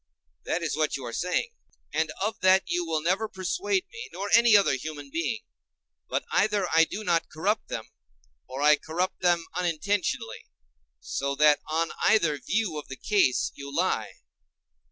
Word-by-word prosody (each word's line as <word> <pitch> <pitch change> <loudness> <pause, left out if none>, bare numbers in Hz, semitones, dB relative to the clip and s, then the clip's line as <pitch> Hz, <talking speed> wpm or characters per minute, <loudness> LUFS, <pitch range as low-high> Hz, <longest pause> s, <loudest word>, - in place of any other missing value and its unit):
that 170 - -1
is 160 - -1
what 155 -1 0
you 130 - -8
are 115 - -6
saying, 180 - -1 0.4
and 160 +1 +1 0.2
of 220 - -3
that 185 +1 +5
you 175 0 -1
will 160 -2 -2
never 190 +6 +1
persuade 365 - -1
me 455 0 -8
or 200 +1 -4
any 235 -2 +7
other 200 - +3
human 145 +1 -6
being. 195 +7 -2 0.7
But - - -1
either 205 -3 +2
I 165 0 +6
do 210 +6 -6
not 170 -4 +1
corrupt 205 +7 -1
them, 110 - -5 0.6
or 135 +2 -4
I 150 0 +6
corrupt 170 +5 -3
them 175 -2 +2
unintentionally, 175 - -2 0.5
so 140 - -3
that 150 0 +5
on 165 +1 0
either 165 -9 +3
view 190 - -1
of 150 - -11
the 135 - -7
case 195 -12 +2
you 140 0 -9
lie. - - 0
170 Hz, 165 wpm, -27 LUFS, 150-205 Hz, 0.7 s, any